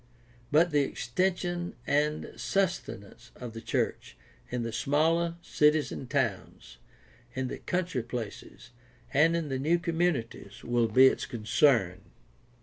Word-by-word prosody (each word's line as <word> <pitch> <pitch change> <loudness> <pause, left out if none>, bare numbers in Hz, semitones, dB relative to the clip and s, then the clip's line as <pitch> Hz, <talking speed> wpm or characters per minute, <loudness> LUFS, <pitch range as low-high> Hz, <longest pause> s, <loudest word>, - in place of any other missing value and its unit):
But 160 +3 +4
the 145 -1 +3
extension 175 +6 -2
and 150 +2 0
sus 190 -2 0
tenance 100 +4 -12
of 120 -3 -8
the 115 - -7
church - - -2 0.3
in 125 -1 -2
the 115 - -3
smaller 160 +8 +1
cities 150 0 +2
and 130 - -7
towns, 125 -9 -3 0.6
in 130 -1 -2
the - - -6
country 180 -7 -2
places, 115 0 -7 0.4
and 160 +4 +4
in 165 -3 -2
the 130 -1 -2
new 160 +6 +2
communities 165 - -2
will 120 -1 +1
be 130 +4 +6
its 130 - +2
con 115 -3 -7
cern. 105 -7 +3
140 Hz, 140 wpm, -29 LUFS, 120-170 Hz, 0.6 s, be